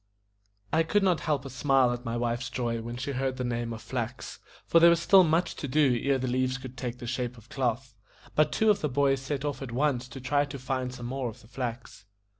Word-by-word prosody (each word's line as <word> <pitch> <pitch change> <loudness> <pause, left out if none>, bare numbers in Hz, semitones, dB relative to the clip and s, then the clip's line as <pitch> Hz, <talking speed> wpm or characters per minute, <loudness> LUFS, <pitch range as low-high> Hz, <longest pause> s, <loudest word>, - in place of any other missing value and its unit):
I 160 - +4
could 195 +5 +2
not 180 -4 +3
help 140 -3 0
a - - -5
smile 130 -1 +3
at 120 0 -6
my 115 -2 -3
wife's 120 +2 -1
joy 120 -2 -2
when 120 +1 -6
she 130 +3 -3
heard 130 0 -2
the 125 - -2
name 120 -1 -2
of 110 -1 -7
flax; 120 +1 -5 0.3
for 165 - +5
there 170 +1 +8
was 170 -1 +4
still 190 +2 +6
much 165 +2 +1
to 145 - -4
do 140 -2 +3
ere 140 -1 +2
the 130 0 -2
leaves 130 +1 0
could 130 -1 -9
take 125 -2 -4
the 120 - -8
shape 125 0 -3
of 115 +1 -17
cloth. 125 -1 -2 0.4
But 155 - +3
two 220 -1 +4
of 205 - 0
the 150 - 0
boys 135 0 +2
set 140 +1 -3
off 145 -1 -3
at 135 -3 -6
once 125 -1 0
to 135 - -9
try 145 +3 +1
to 140 -1 -7
find 130 -1 -2
some 125 -1 -8
more 130 0 -2
of 115 +2 -12
the 110 - -18
flax. 120 -4 -6
130 Hz, 245 wpm, -28 LUFS, 120-140 Hz, 0.4 s, there